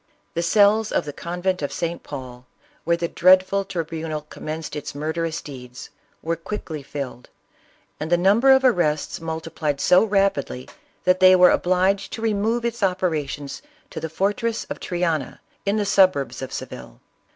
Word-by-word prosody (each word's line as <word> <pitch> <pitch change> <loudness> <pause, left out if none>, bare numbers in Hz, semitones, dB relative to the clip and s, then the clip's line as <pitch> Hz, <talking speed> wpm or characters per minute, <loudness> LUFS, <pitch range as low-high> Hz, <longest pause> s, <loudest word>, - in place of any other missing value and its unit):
The 170 - -1
cells 210 +4 +4
of - - 0
the 145 - -6
convent 180 +3 -2
of 145 - -2
St. 170 0 -3
Paul, 130 -3 -9 0.4
where 170 0 +2
the 170 - -1
dreadful 185 +3 +4
tribunal 160 -3 -4
commenced 155 0 -6
its 150 -1 -6
murderous 160 +2 -3
deeds, 125 -3 -10 0.3
were 165 +1 0
quickly 165 -2 -6
filled; 135 -3 -7 0.7
and 155 +2 -4
the 175 - +5
number 205 +9 +4
of 265 0 +5
arrests 170 - +1
multiplied 160 -3 -3
so 180 +6 +5
rapidly 195 -10 0 0.4
that 185 0 +3
they 185 0 +8
were 180 -1 +7
obliged 190 +2 +1
to 225 - -5
remove 225 +2 0
its 235 0 -3
operations 160 -7 -1 0.3
to - - -5
the 160 - -4
for 195 +6 0
tress 230 +1 -2
of - - -4
Triana 170 -5 -2 0.3
in 200 +2 +2
the 210 - 0
suburbs 185 - +3
of 130 - -6
Seville. - - -8
170 Hz, 160 wpm, -23 LUFS, 150-195 Hz, 0.7 s, they